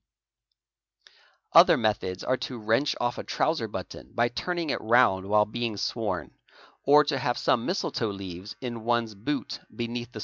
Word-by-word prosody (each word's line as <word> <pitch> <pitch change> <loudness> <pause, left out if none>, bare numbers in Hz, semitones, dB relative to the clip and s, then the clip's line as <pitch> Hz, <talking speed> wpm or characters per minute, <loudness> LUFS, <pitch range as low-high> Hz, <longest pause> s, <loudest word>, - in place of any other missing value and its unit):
Other - - +8
methods 100 -4 -1
are 130 - +1
to 130 - -5
wrench 115 +6 +1
off 120 0 -1
a - - -4
trouser - - 0
button - - -8
by 120 +1 +2
turning 170 +4 -2
it - - -2
round 110 -5 +3
while\ 105 +1 +4
being 115 -1 -3
sworn - - -2 0.5
or 150 +2 +6
to 140 -2 -1
have 120 -2 -1
st 125 - +2
me - - -5
misletoe 125 - -1
leaves 95 0 -8
in 120 -3 -5
one's 120 -1 0
boot 130 +8 -4 0.2
beneath 120 0 -4
the. 110 - -6
120 Hz, 165 wpm, -27 LUFS, 105-130 Hz, 0.5 s, Other